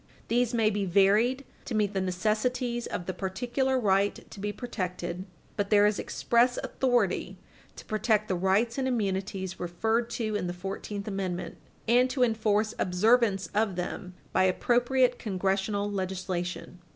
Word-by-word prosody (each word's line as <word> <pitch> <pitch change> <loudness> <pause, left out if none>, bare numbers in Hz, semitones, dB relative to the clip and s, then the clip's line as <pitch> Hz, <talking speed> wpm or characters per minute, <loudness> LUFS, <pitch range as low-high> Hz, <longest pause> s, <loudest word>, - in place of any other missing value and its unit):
These 240 0 +2
may 225 -3 +2
be 205 -1 -1
varied 205 +8 +3 0.2
to 235 - -3
meet 210 -1 +1
the 190 - 0
necessities 225 +6 -1
of 175 - -4
the 185 - -3
particular 245 +8 -1
right 200 -2 +1
to - - -10
be 205 +1 -2
protected." 185 -5 -4 0.3
But 200 -1 -1
there 205 -1 +5
is 210 0 +2
express 245 +1 +2
authority 230 -7 0 0.4
to - - -11
protect 215 0 +1
the 190 - 0
rights 195 +7 +1
and 260 - 0
immunities 195 -5 -2
referred 220 +7 0
to 215 -3 -2
in 195 -3 -1
the 175 - -3
Fourteenth 195 +2 -5
Amendment, 190 -3 -3 0.3
and 245 +3 +4
to 255 -1 +1
enforce 220 -2 +1
observance 205 +2 +2
of 210 -2 +1
them 180 +1 -5 0.2
by 185 - +4
appropriate 245 +5 +2
congressional 200 +1 -1
legislation. 185 -2 -4
205 Hz, 150 wpm, -28 LUFS, 190-235 Hz, 0.4 s, there